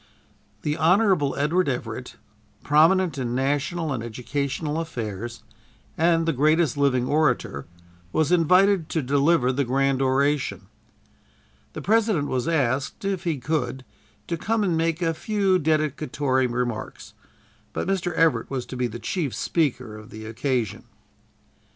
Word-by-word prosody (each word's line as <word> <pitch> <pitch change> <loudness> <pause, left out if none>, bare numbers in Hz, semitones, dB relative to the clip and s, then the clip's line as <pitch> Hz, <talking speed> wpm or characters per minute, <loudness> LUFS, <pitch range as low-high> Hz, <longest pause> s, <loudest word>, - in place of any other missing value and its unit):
The 150 +1 -1
Hon. 180 -3 +3
Edward 155 +4 +1
Everett, 120 -1 -5 0.5
prominent 160 +1 +3
in 120 -1 -2
national 145 +4 -1
and 120 - -3
educational 140 +6 -3
affairs, 115 - -5 0.5
and 165 0 +2
the 165 - +1
greatest 155 +2 +2
living 135 -3 +2
orator, 130 - 0 0.4
was 155 - +1
invited 180 +1 +4
to 160 - -1
deliver 140 0 +3
the 140 +2 0
grand 135 +1 +1
oration. 135 -6 +1 1.1
The - - -7
President 210 -8 +2
was 130 +3 -1
asked, 140 0 0
if 195 -2 -2
he 165 -4 0
could, 130 -2 -2 0.4
to 170 - -3
come 220 +5 0
and 180 -4 +1
make 165 +1 0
a 165 -1 +1
few 195 +1 +1
dedicatory 150 -4 0
remarks, 120 -2 -4 0.6
but - - -3
Mr. 190 -2 0
Everett 165 -1 +2
was 130 -3 -3
to - - -8
be 125 -1 0
the 120 0 -7
chief 150 +1 -3
speaker 130 -9 -1
of 110 0 -12
the 110 0 -9
occasion. 120 -1 -2
145 Hz, 135 wpm, -24 LUFS, 125-165 Hz, 1.1 s, invited